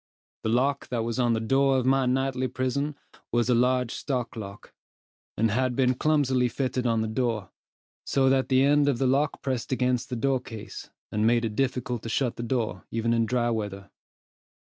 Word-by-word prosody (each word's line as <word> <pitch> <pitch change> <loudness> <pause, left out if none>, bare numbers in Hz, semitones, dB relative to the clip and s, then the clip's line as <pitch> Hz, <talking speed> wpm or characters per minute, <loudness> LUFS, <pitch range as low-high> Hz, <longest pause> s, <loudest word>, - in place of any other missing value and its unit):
The 110 - -2
lock 130 +4 +1
that 120 -3 -2
was 115 +1 -3
on 120 -2 +3
the 110 - 0
door 135 +4 +2
of 125 - 0
my 135 0 +3
nightly 130 0 0
prison 130 +4 -2 0.4
was 120 0 +1
a - - +5
large 125 0 +2
stock 125 -5 -3
lock, 100 -2 -9 0.6
and 110 0 +2
had 130 +2 0
been 130 -1 +3
clumsily 130 -3 +2
fitted 125 0 -1
on 115 -1 +1
the 110 - -1
door, 110 -3 -2 0.5
so 135 -1 +2
that 130 0 +2
the 130 0 +4
end 145 0 +4
of 135 - +1
the 135 - 0
lock 140 +3 +1
pressed 130 -3 -2
against 125 -2 0
the 125 - -3
door 130 +3 +1
case, 110 -3 -9 0.2
and 105 +1 +1
made 120 0 +3
it 110 -2 -4
difficult 125 -2 -1
to 115 - -6
shut 125 +1 0
the - - -6
door 115 -6 -2
even 115 +1 0
in 115 -1 +2
dry 120 0 +1
weather. 100 -3 -4
125 Hz, 195 wpm, -26 LUFS, 115-130 Hz, 0.6 s, a